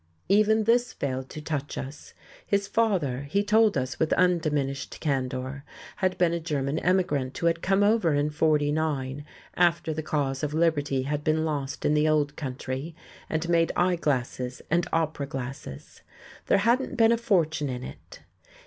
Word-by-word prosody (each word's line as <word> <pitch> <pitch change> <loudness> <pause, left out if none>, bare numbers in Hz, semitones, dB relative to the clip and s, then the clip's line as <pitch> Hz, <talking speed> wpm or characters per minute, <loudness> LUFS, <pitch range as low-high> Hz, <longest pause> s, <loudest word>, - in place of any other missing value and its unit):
Even 215 +2 +4
this 240 +3 +2
failed 130 -1 -3
to 155 - -8
touch 145 -2 -3
us. 140 +2 -8 0.3
His 200 0 +1
father 175 - 0
he 200 +7 +1
told 215 0 +3
us 130 +1 -3
with 160 - +1
undiminished 155 -6 0
candour 135 -1 -2 0.3
had 185 -1 0
been 175 -2 +2
a 170 - -1
German 150 -2 -2
emigrant 150 -8 0
who - - -3
had 165 0 +2
come 195 +1 +2
over 205 -7 +3
in 145 +1 +1
'49, 150 -2 0 0.3
after 170 -2 +2
the 155 - -3
cause 140 -3 -1
of 150 0 -2
liberty 145 -5 +1
had 150 +2 -2
been 155 +1 +1
lost 145 -3 -3
in 150 - +3
the 150 +1 +3
old 150 -2 +1
country, 135 +3 -5 0.3
and 160 +1 -1
made 165 -1 +3
eye 180 0 +2
glasses 130 -5 -2
and 170 +1 +2
opera 155 -3 -1
glasses. 130 - -7 0.5
There - - +4
hadn't 235 +7 +1
been 225 -1 +5
a - - +5
fortune 160 -10 +1
in 125 -1 -4
it. - - -11
155 Hz, 165 wpm, -26 LUFS, 140-175 Hz, 0.5 s, been